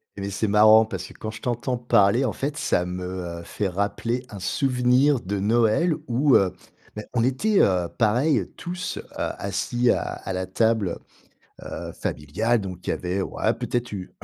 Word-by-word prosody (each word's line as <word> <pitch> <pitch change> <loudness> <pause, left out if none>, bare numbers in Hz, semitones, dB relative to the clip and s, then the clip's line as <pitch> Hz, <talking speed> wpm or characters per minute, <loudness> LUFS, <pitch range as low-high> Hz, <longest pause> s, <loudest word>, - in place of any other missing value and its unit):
Mais, 100 0 -4
c'est 105 +3 -1
marrant 110 +2 +7
parce 95 -4 -5
que - - -12
quand 110 - -6
je 110 - -10
t'entends 125 +1 -1
parler, 120 +1 +3
en 115 - -1
fait, 145 +1 -3
ça 90 - +1
me, 90 0 -5 0.3
heu, - - -9
fait 100 +4 -3
rappeler 105 +6 -2
un 100 - -8
souvenir 125 +6 +2
de 100 -1 -3
Noël 115 - +3
où, 130 +3 +3
heu, 95 -2 +3 0.4
bah, 105 - -5
on 115 -2 +2
était, 190 - +2
heu, 90 -3 +2
pareil, 125 +7 +2
tous, 180 +1 -5
heu, - - -4 0.2
assis 120 +5 0
à - - +1
à 95 - -5
la 95 0 -3
table, 110 -2 +1 0.7
heu, - - -9 0.2
heu, - - -7
familiale. 110 +11 -1
Donc, 90 -3 -7
il - - 0
y - - +2
avait, 90 +2 -2
ouais, - - 0
peut-être 120 -1 -3
eu 95 -3 -6
110 Hz, 185 wpm, -24 LUFS, 95-125 Hz, 0.7 s, marrant